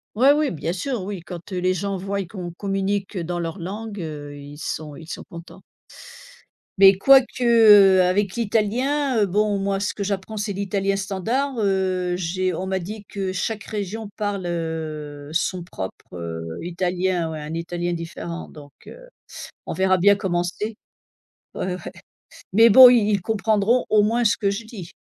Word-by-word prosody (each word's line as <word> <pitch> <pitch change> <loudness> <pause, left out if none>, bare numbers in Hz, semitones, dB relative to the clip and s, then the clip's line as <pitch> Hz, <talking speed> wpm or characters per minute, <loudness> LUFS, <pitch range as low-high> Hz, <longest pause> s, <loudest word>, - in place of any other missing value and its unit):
Ouais 260 +6 +6
oui, 300 -1 +1
bien 165 +1 -3
sûr. 230 +2 -3
Oui, 195 -3 -5
quand, 175 +2 -10
heu, 185 - -2
les 185 +1 +1
gens 200 +1 -2
voient 195 +1 -3
qu'on 175 -2 -7
communique, 195 +2 -2
heu, 180 - -2
dans 175 +1 -3
leur 165 +3 -4
langue, 205 +4 -6
heu, 145 -3 -7
ils 145 +1 -11
sont 150 -1 -5
ils 160 - -11
sont - - -7
contents. 170 0 -12 1.2
Mais 195 0 +9
quoique, 260 +4 +4
heu, 205 -5 +7
avec 190 +2 +1
l'italien, 240 +5 0
heu, 210 - +4
bon, 205 +2 +1
moi 195 0 -1
ce 205 - -2
que 205 - -3
j'apprends 200 +2 -4
c'est 205 0 -2
l'italien 195 0 -1
standard. 225 +8 -2
Heu, 190 -3 0
j'ai 185 +1 -1
on 185 +3 -4
m'a 190 0 0
dit 205 +4 -7
que 195 -2 -4
chaque 205 +2 -3
région 215 0 -5
parle, 205 -2 -4
heu, 155 -4 -5
son 175 +1 -1
propre, 95 - -8
heu, 85 -1 -5 0.2
italien, 180 -1 -1
ouais, 155 -1 -6
un 155 +2 -6
italien 175 +1 -3
différent 170 0 -6
donc, 145 -2 -14
heu, - - -13 0.6
on - - -4
verra 190 0 +2
bien 200 +3 +5
comment 180 -4 -1
c'est. 210 +4 -4 0.8
Ouais, 180 -1 -3
ouais. - - -9 0.6
Mais 225 +3 +7
bon, 255 +4 +11
ils 230 -4 +4
ils 200 -2 +1
comprendront 220 +3 +1
au 210 -1 +5
moins 235 +3 +1
ce 210 - +2
que 200 - +1
je 200 +3 -4
dis, 210 -7 -10
195 Hz, 175 wpm, -22 LUFS, 175-210 Hz, 1.2 s, bon